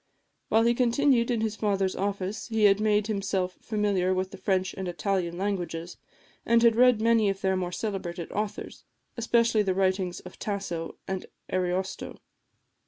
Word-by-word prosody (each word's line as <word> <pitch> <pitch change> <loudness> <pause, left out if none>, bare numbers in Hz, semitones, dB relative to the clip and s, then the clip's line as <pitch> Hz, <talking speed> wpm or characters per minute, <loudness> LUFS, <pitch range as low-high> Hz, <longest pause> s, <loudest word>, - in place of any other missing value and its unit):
While 225 +1 +4
he 235 +1 +4
continued 245 0 +2
in 235 -3 0
his 220 -1 -1
father's 195 -3 0
office 200 +1 -3
he 220 -2 0
had 200 -1 +6
made 210 -1 +2
himself 195 -3 -2
familiar 200 -4 0
with 185 0 -2
the - - -9
French 190 0 0
and 190 -1 -5
Italian 175 -1 -1
languages, 175 -3 -3 0.5
and 235 0 +3
had 230 -1 +5
read 250 -1 +5
many 225 -2 +3
of 195 0 -3
their 190 -1 +1
more 180 -1 -2
celebrated 180 -4 -4
authors, 210 0 -4 0.3
especially 235 -1 +2
the 190 -3 0
writings 185 -1 0
of 180 - -13
Tasso 195 -5 -4
and 190 -1 -4 0.3
Ariosto. 185 +1 -2
195 Hz, 160 wpm, -27 LUFS, 185-220 Hz, 0.5 s, had